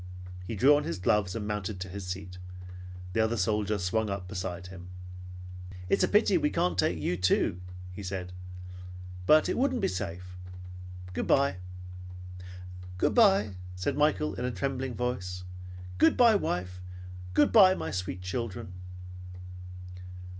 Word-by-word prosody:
He 115 Hz, -, -3 dB
drew 135 Hz, +8 st, +6 dB
on 145 Hz, -, +1 dB
his 85 Hz, -, -3 dB
gloves 90 Hz, +1 st, +1 dB
and 110 Hz, -2 st, -3 dB
mounted 105 Hz, -2 st, -3 dB
to 95 Hz, -, -4 dB
his 95 Hz, 0 st, -7 dB
seat. 90 Hz, 0 st, -6 dB, 0.7 s
The 115 Hz, -, 0 dB
other 110 Hz, +1 st, +2 dB
soldier 105 Hz, +1 st, +1 dB
swung 105 Hz, +4 st, 0 dB
up 100 Hz, -2 st, -4 dB
beside 90 Hz, -1 st, -5 dB
him. 90 Hz, -1 st, -10 dB, 1.0 s
"It's -, -, +3 dB
a -, -, +4 dB
pity -, -, +4 dB
we -, -, +2 dB
can't 90 Hz, -1 st, 0 dB
take 90 Hz, -1 st, +1 dB
you 80 Hz, +3 st, -1 dB
too," 90 Hz, 0 st, +1 dB, 0.4 s
said 90 Hz, -2 st, -5 dB
he; 90 Hz, -, -11 dB, 0.9 s
"but 155 Hz, 0 st, +6 dB
it -, -, 0 dB
wouldn't 260 Hz, -1 st, +1 dB
be -, -, +1 dB
safe. 90 Hz, 0 st, -5 dB, 0.8 s
Good -, -, -2 dB
bye." 140 Hz, -7 st, +3 dB, 1.4 s
"Good -, -, +2 dB
bye," 195 Hz, -, +4 dB, 0.2 s
said 90 Hz, +6 st, -2 dB
Michael 150 Hz, +1 st, +2 dB
in 125 Hz, -, -4 dB
a -, -, 0 dB
trembling 130 Hz, -1 st, -3 dB
voice. 90 Hz, -8 st, -3 dB, 0.6 s
"Good 160 Hz, -, +5 dB
bye, 235 Hz, -2 st, +7 dB
wife! 90 Hz, -, -2 dB, 0.5 s
Good 145 Hz, -, +5 dB
bye, 190 Hz, -4 st, +7 dB
my -, -, -4 dB
sweet 90 Hz, -1 st, -4 dB
children!" 105 Hz, +1 st, -4 dB
100 Hz, 145 wpm, -29 LUFS, 90-125 Hz, 1.4 s, bye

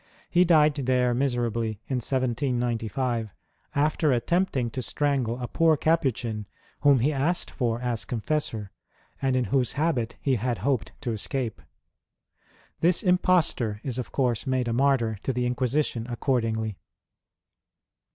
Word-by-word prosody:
He 180 Hz, +1 st, +5 dB
died 155 Hz, -3 st, +5 dB
there 125 Hz, -3 st, +1 dB
miserably, 120 Hz, -4 st, 0 dB
in 130 Hz, -, -1 dB
1795, 120 Hz, -2 st, -1 dB, 0.5 s
after 150 Hz, +1 st, +2 dB
attempting 130 Hz, -1 st, +1 dB
to 130 Hz, -, -3 dB
strangle 130 Hz, -3 st, 0 dB
a 125 Hz, -, -3 dB
poor 160 Hz, +5 st, +3 dB
Capuchin 125 Hz, -10 st, 0 dB, 0.3 s
whom 140 Hz, -4 st, +5 dB
he 150 Hz, +5 st, +2 dB
asked 150 Hz, +6 st, 0 dB
for 120 Hz, -3 st, -1 dB
as 120 Hz, -2 st, -2 dB
confessor, 115 Hz, -4 st, -2 dB, 0.5 s
and 135 Hz, -1 st, +1 dB
in 130 Hz, -, +2 dB
whose 130 Hz, -3 st, +2 dB
habit 140 Hz, -7 st, 0 dB
he 135 Hz, -3 st, +1 dB
had 120 Hz, +1 st, -1 dB
hoped 135 Hz, -5 st, 0 dB
to 125 Hz, -5 st, -2 dB
escape. 115 Hz, +2 st, -3 dB, 1.2 s
This 175 Hz, +1 st, +2 dB
impostor 180 Hz, -, +2 dB
is 130 Hz, -2 st, -2 dB
of 125 Hz, -, -5 dB
course 125 Hz, -4 st, 0 dB
made 130 Hz, -2 st, 0 dB
a 115 Hz, -, 0 dB
martyr 120 Hz, -5 st, +2 dB
to -, -, -1 dB
the 125 Hz, -1 st, -1 dB
Inquisition 125 Hz, -1 st, 0 dB
accordingly. 115 Hz, -4 st, -1 dB
125 Hz, 130 wpm, -26 LUFS, 115-140 Hz, 1.2 s, He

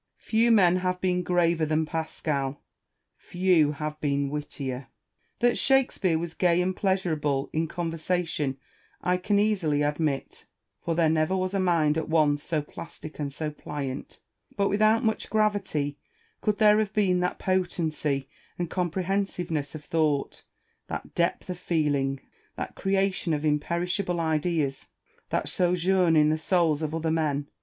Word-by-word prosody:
Few 230 Hz, +1 st, +2 dB
men 185 Hz, -6 st, +5 dB
have 180 Hz, 0 st, -1 dB
been 180 Hz, -1 st, +1 dB
graver 170 Hz, -2 st, +2 dB
than 155 Hz, +1 st, +1 dB
Pascal] 150 Hz, -3 st, -2 dB, 0.6 s
few 175 Hz, -5 st, +2 dB
have 150 Hz, +1 st, -5 dB
been 140 Hz, -1 st, 0 dB
wittier. 140 Hz, -3 st, -4 dB, 0.5 s
That 240 Hz, 0 st, +3 dB
Shakespeare 250 Hz, -10 st, +2 dB
was 170 Hz, 0 st, -4 dB
gay 175 Hz, -1 st, +2 dB
and 185 Hz, +1 st, 0 dB
pleasurable 155 Hz, -8 st, 0 dB
in 160 Hz, +1 st, 0 dB
conversation 165 Hz, -4 st, -2 dB, 0.4 s
I 180 Hz, +1 st, +1 dB
can 200 Hz, +3 st, +1 dB
easily 185 Hz, -9 st, +2 dB
admit; 145 Hz, -1 st, -2 dB, 0.4 s
for 165 Hz, -, -1 dB
there 165 Hz, -1 st, +3 dB
never 155 Hz, +4 st, +2 dB
was 185 Hz, +1 st, -1 dB
a 195 Hz, -, +1 dB
mind 165 Hz, -4 st, +2 dB
at 160 Hz, -, -5 dB
once 150 Hz, -2 st, +3 dB
so 155 Hz, -3 st, -1 dB
plastic 155 Hz, +1 st, -10 dB
and 145 Hz, -2 st, -2 dB
so 155 Hz, +2 st, -4 dB
pliant: 140 Hz, -3 st, -6 dB, 0.4 s
but 200 Hz, -1 st, +2 dB
without 215 Hz, +3 st, +3 dB
much 220 Hz, -, 0 dB
gravity, 195 Hz, -10 st, 0 dB, 0.4 s
could 210 Hz, -1 st, +1 dB
there 210 Hz, 0 st, +5 dB
have 215 Hz, -1 st, -1 dB
been 190 Hz, -4 st, +2 dB
that 180 Hz, 0 st, -1 dB
potency 160 Hz, -7 st, -1 dB, 0.3 s
and 175 Hz, -2 st, -3 dB
comprehensiveness 180 Hz, -4 st, -1 dB
of 150 Hz, -, -9 dB
thought, 155 Hz, -4 st, 0 dB, 0.5 s
that -, -, -6 dB
depth 170 Hz, +1 st, 0 dB
of 180 Hz, -1 st, -5 dB
feeling, 145 Hz, -6 st, 0 dB, 0.3 s
that -, -, -5 dB
creation 195 Hz, -3 st, 0 dB
of 150 Hz, +1 st, -3 dB
imperishable 170 Hz, +4 st, 0 dB
ideas, 155 Hz, -3 st, 0 dB, 0.4 s
that -, -, -1 dB
sojourn 180 Hz, -1 st, +2 dB
in 150 Hz, 0 st, +5 dB
the 155 Hz, -, 0 dB
souls 160 Hz, -3 st, +2 dB
of 155 Hz, 0 st, -2 dB
other 160 Hz, 0 st, -1 dB
men? 145 Hz, -3 st, 0 dB
165 Hz, 145 wpm, -27 LUFS, 150-185 Hz, 0.6 s, men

